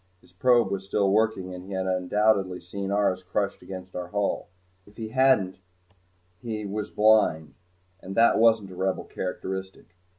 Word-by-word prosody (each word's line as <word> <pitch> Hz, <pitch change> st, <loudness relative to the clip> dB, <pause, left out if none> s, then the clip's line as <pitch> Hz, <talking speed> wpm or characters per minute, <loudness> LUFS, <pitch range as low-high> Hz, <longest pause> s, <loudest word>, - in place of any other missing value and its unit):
His 90 Hz, 0 st, -25 dB
probe 120 Hz, +1 st, +3 dB
was 95 Hz, -1 st, -2 dB
still 100 Hz, 0 st, +1 dB
working 105 Hz, -3 st, +1 dB
and 90 Hz, 0 st, -8 dB
he 95 Hz, +1 st, -8 dB
had 95 Hz, 0 st, -2 dB
undoubtedly 95 Hz, 0 st, +1 dB
seen 95 Hz, +2 st, -6 dB
ours 100 Hz, -2 st, +1 dB
crushed 100 Hz, +2 st, -2 dB
against 95 Hz, -1 st, -9 dB
our 90 Hz, -1 st, -4 dB
hull. 100 Hz, +2 st, -2 dB, 0.4 s
If 105 Hz, -, -20 dB
he 110 Hz, -2 st, -5 dB
hadn't 130 Hz, -8 st, +2 dB, 0.8 s
he 110 Hz, -3 st, -4 dB
was 105 Hz, +1 st, -4 dB
blind 105 Hz, -8 st, +3 dB, 0.5 s
and 95 Hz, +1 st, -7 dB
that 115 Hz, 0 st, +5 dB
wasn't 110 Hz, -4 st, +3 dB
a -, -, -10 dB
Rebel 95 Hz, +1 st, -1 dB
characteristic. 95 Hz, 0 st, -6 dB
95 Hz, 160 wpm, -26 LUFS, 95-110 Hz, 0.8 s, that